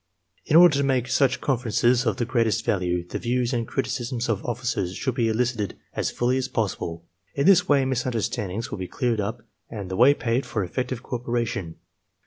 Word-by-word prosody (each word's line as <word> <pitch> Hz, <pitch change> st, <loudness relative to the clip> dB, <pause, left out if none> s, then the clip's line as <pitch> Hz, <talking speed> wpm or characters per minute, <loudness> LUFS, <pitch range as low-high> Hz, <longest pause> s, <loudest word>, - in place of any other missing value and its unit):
In 150 Hz, -, +1 dB
order 170 Hz, -3 st, +8 dB
to -, -, +2 dB
make 130 Hz, -3 st, +1 dB
such 130 Hz, 0 st, +2 dB
conferences 120 Hz, -1 st, +1 dB
of 110 Hz, -, 0 dB
the 120 Hz, -, 0 dB
greatest 115 Hz, -2 st, +1 dB
value, 90 Hz, -3 st, 0 dB
the -, -, -4 dB
views 125 Hz, +1 st, 0 dB
and 115 Hz, -2 st, -1 dB
criticisms 120 Hz, -1 st, -2 dB
of 110 Hz, -4 st, -1 dB
officers 115 Hz, -7 st, -2 dB
should 130 Hz, -, -2 dB
be 115 Hz, -1 st, +1 dB
elicited 110 Hz, -3 st, -1 dB, 0.2 s
as -, -, -1 dB
fully 125 Hz, +2 st, 0 dB
as 130 Hz, -1 st, -1 dB
possible. 85 Hz, -7 st, -3 dB, 0.3 s
In 140 Hz, -, +1 dB
this 195 Hz, -1 st, +5 dB
way 140 Hz, -2 st, +4 dB
misunderstandings 115 Hz, -5 st, -2 dB
will -, -, -5 dB
be 90 Hz, -, -4 dB
cleared 120 Hz, -1 st, -1 dB
up 115 Hz, +4 st, -4 dB, 0.3 s
and 100 Hz, -5 st, -6 dB
the -, -, -2 dB
way 130 Hz, +7 st, +6 dB
paved 120 Hz, +1 st, -1 dB
for 110 Hz, -4 st, -1 dB
effective 125 Hz, +6 st, -3 dB
cooperation. 120 Hz, -7 st, -3 dB
120 Hz, 185 wpm, -24 LUFS, 110-130 Hz, 0.3 s, order